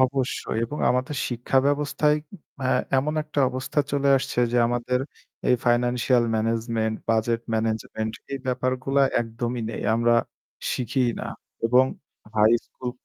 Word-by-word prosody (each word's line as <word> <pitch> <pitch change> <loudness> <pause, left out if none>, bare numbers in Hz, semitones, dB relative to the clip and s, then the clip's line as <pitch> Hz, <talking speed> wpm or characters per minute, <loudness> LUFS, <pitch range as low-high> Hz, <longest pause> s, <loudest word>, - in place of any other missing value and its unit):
অবশ্যই 130 -3 0
এবং 150 +6 -6
আমাদের 130 +4 -1
শিক্ষা 120 +2 +1
ব্যবস্থায় 150 +1 +2 0.5
আ - - +1 0.3
এমন 150 +3 -1
একটা 150 -1 -2
অবস্থা 130 +3 -3
চলে 140 0 +2
আসছে 130 - -3
যে 125 - +2
আমাদের 120 +1 0 0.5
এই 125 - +6
ফাইন্যান্সিয়াল 120 0 +3
ম্যানেজমেন্ট, 115 0 0 0.2
বাজেট 115 +1 +1
ম্যানেজমেন্ট 110 0 -2 0.2
এই 135 - -2
ব্যাপারগুলা 130 +2 +1 0.2
একদমই 120 +1 -3
নেই। - - -5
আমরা 120 +1 +3 0.6
শিখিই 125 0 0
না। - - -4 0.4
এবং 125 +3 +5 0.5
হাই 110 +1 +5
স্কুল 125 -1 -6
125 Hz, 130 wpm, -25 LUFS, 115-130 Hz, 0.6 s, এই